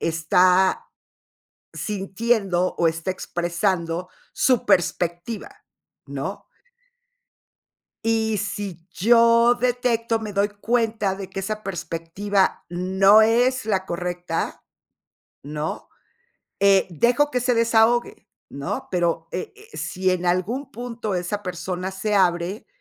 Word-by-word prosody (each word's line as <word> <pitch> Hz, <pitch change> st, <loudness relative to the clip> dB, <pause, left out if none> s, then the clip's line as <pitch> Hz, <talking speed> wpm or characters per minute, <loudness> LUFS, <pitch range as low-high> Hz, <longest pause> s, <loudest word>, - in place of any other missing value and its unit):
está 180 Hz, +3 st, +3 dB, 0.9 s
sintiendo, 195 Hz, -2 st, -1 dB
o 170 Hz, -, +3 dB
está 165 Hz, +3 st, -2 dB
expresando 175 Hz, -1 st, -2 dB, 0.2 s
su 255 Hz, -4 st, +2 dB
perspectiva, 195 Hz, -, -1 dB, 0.4 s
¿no? -, -, -5 dB, 1.6 s
Y 220 Hz, -1 st, +1 dB
sí 195 Hz, -4 st, -5 dB
yo 235 Hz, +3 st, +5 dB
detecto, 240 Hz, -2 st, 0 dB
me 215 Hz, -2 st, -6 dB
doy 200 Hz, +1 st, +2 dB
cuenta 220 Hz, -1 st, 0 dB
de 195 Hz, -1 st, -7 dB
que 195 Hz, -, -5 dB
esa 215 Hz, +2 st, -4 dB
perspectiva 185 Hz, +2 st, -1 dB
no 190 Hz, +4 st, +4 dB
es 245 Hz, +4 st, +3 dB
la 190 Hz, -3 st, 0 dB
correcta, 175 Hz, -1 st, -3 dB, 0.8 s
¿no? 150 Hz, +2 st, -5 dB, 0.7 s
Eh, 195 Hz, -1 st, +4 dB
dejo 245 Hz, -, +2 dB
que 250 Hz, -, 0 dB
se 250 Hz, 0 st, +1 dB
desahogue, 230 Hz, -1 st, +2 dB, 0.2 s
¿no? 140 Hz, 0 st, -5 dB
Pero, 170 Hz, -2 st, 0 dB
e 185 Hz, -, -5 dB
eh, 435 Hz, +2 st, -15 dB
sí 185 Hz, 0 st, -1 dB
en 180 Hz, -1 st, -1 dB
algún 195 Hz, +10 st, -1 dB
punto 230 Hz, -3 st, -4 dB
esa 180 Hz, +3 st, -2 dB
persona 180 Hz, +1 st, -4 dB
se 205 Hz, +2 st, -1 dB
abre, 180 Hz, +2 st, +1 dB
195 Hz, 110 wpm, -23 LUFS, 175-225 Hz, 1.6 s, yo